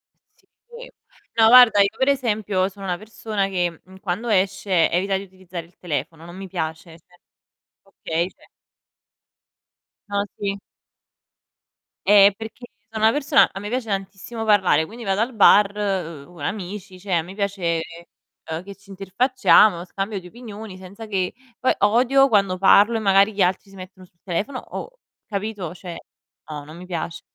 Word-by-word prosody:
E - - -38 0.2
sì. 480 +1 -11 0.5
No, 225 -1 +6
guarda, 240 -3 +8
io 200 - +4
per 265 - +2
esempio 210 -8 0
sono 195 0 -11
una 180 -2 -1
persona 215 0 -3
che, 175 -3 -2
mhmm, 190 +1 -16
quando 195 +6 -3
esce 190 -3 +2
evita 190 +3 0
di 195 - -6
utilizzare 185 -3 -9
il 170 - -26
telefono, 160 0 -5
non 175 +1 -11
mi 195 0 -8
piace. 160 -2 -5
Cioè 180 +2 -26 0.7
okay, 170 -3 -3
cioè. - - -23 1.6
Ah, 200 0 0 0.2
sì. 200 -1 -2 1.5
Ehm, 200 0 +7
perché 225 +3 -9 0.2
so' 220 - -7
una 220 +1 +4
persona 290 +1 +3
a 195 - -7
me 205 +1 -6
piace 245 -1 -3
tantissimo 195 +3 -5
parlare, 190 -6 +3
quindi 230 +7 -10
vado 195 0 0
al 245 +3 -1
bar, 205 -1 +6 0.6
uhm, 175 0 -17
amici, 190 +3 -6
cioè 180 -3 0
mi 180 +4 -11
piace, 195 -5 -1 0.7
uhm, 160 +2 -4
che 200 +1 -10
ci 195 0 -24
interfacciamo, 200 -1 +3
scambio 195 +2 -4
di 180 - -13
opinioni 215 -2 -10
senza 190 +4 -10
che 190 -4 -2 0.3
poi 255 - +2
odio 250 +6 +4
quando 195 -4 +2
parlo 205 +4 +5
e - - +1
magari 200 0 +4
gli 200 - -2
altri 185 +2 +1
si 195 - -16
mettono 185 0 -12
sul 170 -1 -31
telefono 205 +9 -3
oh, - - -9 0.3
capito? 200 -4 -4
Cioè, 180 -1 -9 0.5
no, 150 -1 -6
non 155 +3 -12
mi 180 - -10
piace. 170 -1 -5
195 Hz, 160 wpm, -22 LUFS, 180-220 Hz, 1.6 s, guarda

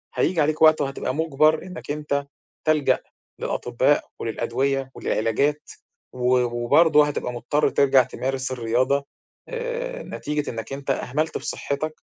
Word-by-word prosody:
هييجي 170 -2 +2
عليك 155 +1 0
وقت 155 -1 +6
وهتبقى 135 -2 -2
مُجبّر 155 0 +2
إنّك 180 -5 -7
أنت 145 -1 -2 0.4
تلجأ 155 -2 +3 0.4
للأطباء - - 0
وللأدوية 135 +2 -1
وللعلاجات 140 +7 0 0.4
و 125 0 +2
وبرضه 145 +6 +4
هتبقى 130 -4 -3
مضطر 145 +5 +1
ترجع 135 -2 +4
تمارس 130 +1 -3
الرياضة 130 +3 +1 0.4
آآ - - -4
نتيجة 150 0 -3
إنّك 115 +2 -6
أنت 140 0 -6
أهملت 150 +4 -1
في - - -11
صحّتك 155 +2 -3
140 Hz, 125 wpm, -24 LUFS, 130-155 Hz, 0.4 s, وقت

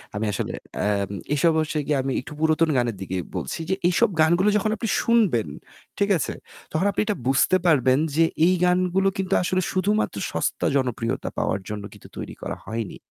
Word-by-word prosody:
আমি 105 +2 -1
আসলে - - -3 0.3
আম 100 -2 0 0.2
এসব 160 +3 +3
অবশ্য 155 0 0 0.3
আমি 135 0 -2
একটু 140 - -10
পুরাতন 160 +1 +2
গানের 120 -3 0
দিকে 95 -1 -3 0.2
বলছি 65 - -3
যে 190 - +2
এইসব 180 +2 +3
গানগুলো 175 +6 +4
যখন 215 +1 0
আপনি 225 - -3
শুনবেন, 210 - +2 0.5
ঠিক 200 0 +2
আছে? - - -2 0.4
তখন 160 +5 0
আপনি - - -1
এটা 210 -1 0
বুঝতে 135 +7 +4
পারবেন 130 -5 +4 0.2
যে 165 - +5 0.2
এই 185 - +4
গানগুলো 185 +2 +2
কিন্তু 190 0 -1
আসলে 185 +1 0
শুধুমাত্র 200 - 0
সস্তা - - -1
জনপ্রিয়তা 125 -4 -1
পাওয়ার 95 - 0
জন্য 105 -1 -5
কিন্তু - - -14
তৈরি - - -6
করা - - -4
হয়নি। 110 -1 -4
160 Hz, 175 wpm, -24 LUFS, 120-185 Hz, 0.5 s, যে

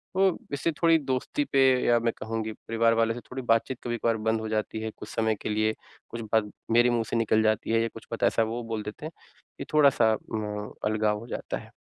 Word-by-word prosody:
तो 190 -1 +3 0.2
इससे 140 +4 0
थोड़ी 165 -1 +6
दोस्ती 135 - -1
पे 135 - +5 0.2
या 120 -1 +4
मैं 115 0 0
कहूँ 115 0 -3
कि 110 - -4
परिवार 115 +1 +1
वालों 115 0 +2
से - - -5
थोड़ी 130 +1 -4
बातचीत 115 +2 +1
कभी-कभार 115 -1 0
बंद 110 +1 0
हो 110 - -4
जाती 110 0 -2
है 110 0 -3
कुछ - - -9
समय 110 -1 0
के - - -3
लिए, 110 +1 +1 0.4
कुछ 115 - -6
बात 105 -2 +2 0.2
मेरे 120 +2 +5
मुँह 120 -1 +1
से - - -2
निकल 110 -1 +2
जाती 110 0 +1
है 115 0 +3
या 115 - +1
कुछ - - -11
पता - - +2
ऐसा 115 - +2
वो 115 +2 -3
बोल 110 -1 -2
देते 105 +8 -7
हैं। 155 - -5 0.5
ये - - -3
थोड़ा 150 -2 +7
सा 110 -4 +3 0.2
म 105 -1 -4
अलगाव 105 0 +1
हो 115 - -10
जाता - - -4
है। - - -12
115 Hz, 240 wpm, -27 LUFS, 110-120 Hz, 0.5 s, थोड़ा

